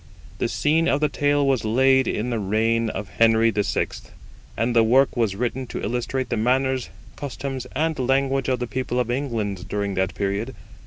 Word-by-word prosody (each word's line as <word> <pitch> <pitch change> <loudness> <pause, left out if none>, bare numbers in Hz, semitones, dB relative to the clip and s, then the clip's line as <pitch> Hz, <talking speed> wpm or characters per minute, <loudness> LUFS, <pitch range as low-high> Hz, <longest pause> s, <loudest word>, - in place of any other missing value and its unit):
The - - +1
scene 160 +3 +1
of 140 - +2
the 150 0 +1
tale 145 +1 +1
was 135 -3 +1
laid 130 +4 +3
in 120 +4 -1
the 115 - -1
reign 110 +3 +1
of 100 -1 -5
Henry 115 +2 +3
VI, 105 -1 0 0.7
and 120 +1 0
the 115 - +6
work 130 +5 +3
was 115 -5 0
written 125 +3 -2
to - - -5
illustrate 125 +3 -2
the 120 - -1
manners, 130 +2 +1 0.3
customs, 135 -2 -5
and 160 -1 0
language 135 +1 +1
of 130 - +1
the 125 - -3
people 125 +1 -2
of 120 -1 0
England 110 -8 -3
during 100 -1 -2
that 95 0 -1
period. 100 +5 -2
120 Hz, 180 wpm, -23 LUFS, 110-135 Hz, 0.7 s, the